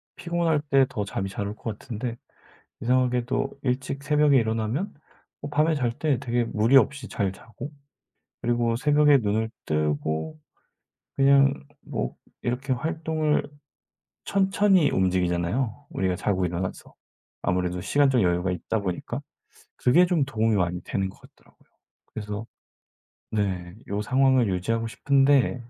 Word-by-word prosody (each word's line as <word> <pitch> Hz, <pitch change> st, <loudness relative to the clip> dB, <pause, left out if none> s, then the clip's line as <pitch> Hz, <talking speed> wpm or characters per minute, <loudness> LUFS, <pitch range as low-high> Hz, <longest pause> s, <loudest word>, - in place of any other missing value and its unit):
피곤할 170 Hz, -3 st, 0 dB
때 135 Hz, -2 st, +4 dB
더 105 Hz, -, -3 dB
잠이 100 Hz, -1 st, -3 dB
잘 100 Hz, +1 st, -4 dB
올 105 Hz, -, -5 dB
것 110 Hz, -2 st, -5 dB
같은데 115 Hz, +1 st, -5 dB, 0.7 s
이상하게도 125 Hz, +2 st, 0 dB
일찍 135 Hz, +1 st, -2 dB
새벽에 150 Hz, -1 st, +4 dB
일어나면 115 Hz, -, -1 dB, 0.5 s
어 145 Hz, -, -5 dB
밤에 155 Hz, +2 st, +2 dB
잘 125 Hz, -5 st, 0 dB
때 150 Hz, -5 st, +1 dB
되게 120 Hz, 0 st, 0 dB
무리 115 Hz, +4 st, +4 dB
없이 135 Hz, +1 st, +2 dB
잘 100 Hz, -3 st, -1 dB
자고, 115 Hz, +8 st, -10 dB, 0.7 s
그리고 120 Hz, -1 st, +1 dB
새벽에 145 Hz, +2 st, +5 dB
눈을 110 Hz, 0 st, -1 dB, 0.2 s
뜨고 75 Hz, -, -1 dB, 0.8 s
그냥 140 Hz, 0 st, +5 dB, 0.3 s
뭐 -, -, -4 dB, 0.3 s
이렇게 130 Hz, +3 st, -1 dB
활동을 155 Hz, +2 st, 0 dB, 0.8 s
천천히 195 Hz, -4 st, +3 dB
움직이잖아요, 95 Hz, +8 st, 0 dB
우리가 95 Hz, -1 st, -1 dB
자고 95 Hz, 0 st, 0 dB
일어나서. 90 Hz, +1 st, -4 dB, 0.5 s
아무래도 90 Hz, 0 st, 0 dB
시간적 135 Hz, 0 st, +3 dB
여유가 90 Hz, 0 st, +1 dB
있다 90 Hz, +5 st, -2 dB
보니까. 90 Hz, -3 st, -4 dB, 0.6 s
그게 170 Hz, +9 st, +4 dB
좀 175 Hz, -5 st, +2 dB
도움이 110 Hz, -4 st, +1 dB
많이 90 Hz, -1 st, 0 dB
되는 95 Hz, -1 st, -2 dB
것 -, -, -15 dB
같더라고요. -, -, -22 dB, 0.5 s
그래서 105 Hz, +1 st, -5 dB, 0.9 s
네 95 Hz, -4 st, -2 dB
요 100 Hz, +1 st, -2 dB
상황을 130 Hz, 0 st, +3 dB
유지하고 115 Hz, +6 st, -1 dB
싶은데 135 Hz, -1 st, +2 dB
120 Hz, 290 characters per minute, -25 LUFS, 100-140 Hz, 0.9 s, 새벽에